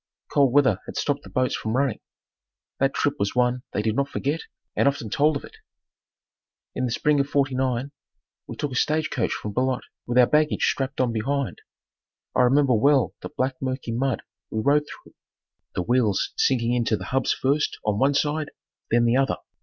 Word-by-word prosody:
Cold 140 -3 +4
weather 130 -8 +4
had - - -7
stopped 145 -1 0
the - - -13
boats 130 0 0
from 110 +3 -2
running. 135 -4 0 0.8
That 135 +1 +1
trip 145 - 0
was 100 +3 -1
one 125 0 +2
they 105 - -1
did 110 0 0
not 140 +1 0
forget 145 +4 -2 0.3
and - - +3
often 140 -6 -1
told 150 +1 +3
of - - -11
it. - - -13 1.2
In 130 - -1
the 125 - -2
spring 150 +4 +2
of 140 0 0
'49 130 -1 0 0.6
we - - -7
took 145 - -3
a - - -5
stage 155 +3 +1
coach 115 - 0
from 105 - -4
Beloit, 130 +2 0 0.2
with 120 +1 0
our 125 - +8
baggage 150 +3 +2
strapped 135 0 -1
on 125 -3 +1
behind. 135 +4 -2 0.7
I - - +4
remember 135 +1 +4
well 135 +3 +3
the - - -6
black 130 0 -2
mucky 130 -2 -3
mud 125 +1 -1 0.3
we 110 - -2
rode 145 +5 +3
through, - - -13 0.6
the 90 - 0
wheels 120 -3 +1
sinking 120 -2 +2
in 120 -1 +1
to 110 -1 +1
the - - -7
hubs 135 0 +2
first 145 +3 0
on 105 -1 +1
one 140 +2 +3
side 150 +1 0 0.4
then 120 +1 +3
the 120 +2 +3
other. 135 0 +1
130 Hz, 195 wpm, -24 LUFS, 120-140 Hz, 1.2 s, our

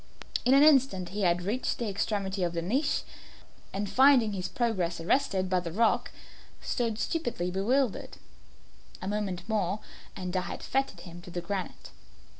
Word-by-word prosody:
In 255 +2 +6
an 280 - +7
instant 270 - +4
he 205 +3 -4
had 175 -1 +2
reached 225 +7 -1
the 235 - -2
extremity 200 -1 -2
of 175 -1 0
the 170 -1 -2
niche, 270 - 0 0.7
and 200 +1 -2
finding 255 -3 +5
his 185 -2 -3
progress 185 -9 -1
arrested 190 0 +1
by 185 0 +2
the 170 -2 -5
rock, 225 +6 +2 0.5
stood 230 -4 -1
stupidly 220 - -2
bewildered. 230 +6 0 0.8
A 185 - -6
moment 195 -3 -2
more 205 -3 0 0.4
and 180 -1 -5
I 185 - +2
had - - -6
fettered 270 +1 -1
him 175 -1 -10
to 175 - -12
the 175 0 -4
granite. 190 +1 -5
200 Hz, 160 wpm, -29 LUFS, 180-240 Hz, 0.8 s, an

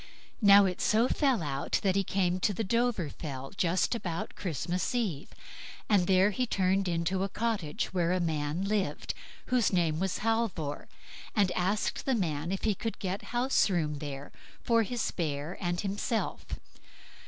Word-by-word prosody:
Now, 200 -1 +8
it 185 -1 -2
so 225 +3 +3
fell 265 - +2
out, 140 -2 -1
that 190 -2 +2
he 195 - +3
came 185 -1 0
to 205 +2 +1
the 225 - -1
Dovrefell 175 - -2
just 180 +2 +1
about 175 -8 -4
Christmas 180 - -2
Eve, 195 - -1 0.6
and 195 -5 +3
there 190 +2 +4
he 250 +5 -1
turned 190 -1 +1
into 175 +2 0
a 195 - 0
cottage 210 -10 -2
where 175 -2 +1
a 185 - +2
man 160 0 -1
lived, 195 -7 -1 0.4
whose 245 -4 +3
name 165 -4 +1
was 190 -2 -1
Halvor, 220 -11 -1 0.5
and 200 -4 +3
asked 195 +8 -1
the 265 - +3
man 165 -5 -1
if 195 - -3
he 215 - +3
could 225 +3 -4
get 190 0 -4
house 245 -1 +2
room 155 -6 -1
there, 140 -1 -6 0.3
for 230 -2 +3
his 235 +2 -1
bear 155 0 -3
and 175 -1 -1
himself. 205 +3 -2
185 Hz, 160 wpm, -30 LUFS, 165-215 Hz, 0.6 s, Now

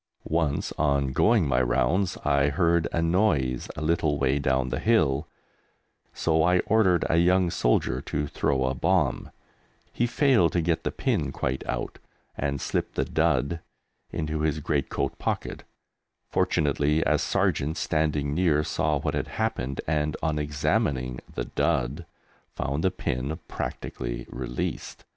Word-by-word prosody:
Once, 80 -3 0
on 70 -3 +2
going 105 - +3
my 65 -2 +2
rounds, 65 +10 +1
I 70 -1 +3
heard 85 +2 +2
a 85 - 0
noise 80 - +1
a - - -5
little 75 -2 +1
way 70 0 +1
down 65 -1 +1
the - - -2
hill, 80 -10 +2 0.8
so 80 -1 +1
I 90 +3 +4
ordered 95 -6 +3
a 80 - +2
young 90 +1 +3
soldier - - +1
to 75 0 -2
throw 70 -2 0
a 65 - 0
bomb; 65 - +1 0.6
he 120 - +1
failed 125 - +3
to 85 - +2
get 85 0 0
the - - 0
pin - - -1
quite 65 +1 -2
out - - -3 0.4
and 70 0 -2
slipped - - -2
the - - 0
"dud" 85 +4 +1 0.5
into 75 0 -2
his 75 -1 0
great 70 -2 -1
coat - - -2
pocket; - - -3 0.7
fortunately, 75 +1 +1
a 75 -1 +2
sergeant 75 +5 0
standing 75 -3 0
near 80 -3 +2
saw 75 0 0
what 70 - -2
had - - -2
happened 110 - -2
and, 75 -1 0
on 80 -2 0
examining 70 -3 0
the - - -4
"dud," 70 +8 -1 0.5
found 70 +4 -2
the 95 - +4
pin 70 -2 -3
practically - - -5
released! 60 0 -5
75 Hz, 145 wpm, -26 LUFS, 70-85 Hz, 0.8 s, I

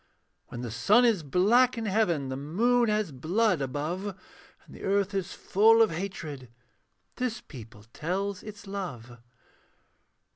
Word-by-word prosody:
When 120 - -7
the 120 -3 -5
sun 205 - +4
is 225 -7 +3
black 220 - +3
in 225 - -3
heaven, 180 -10 +1
The 130 - -3
moon 225 - +1
as 210 -5 0
blood 175 - +1
above, 170 +9 -3 0.5
And - - -14
the - - -12
earth 200 0 0
is 195 -1 -3
full 225 +3 +4
of 215 - +1
hatred, 160 -7 -6 0.7
This 250 -2 -2
people 115 -4 -12
tells 190 +4 -3
its 210 -1 -10
love. 130 - -6
190 Hz, 140 wpm, -28 LUFS, 145-215 Hz, 0.7 s, sun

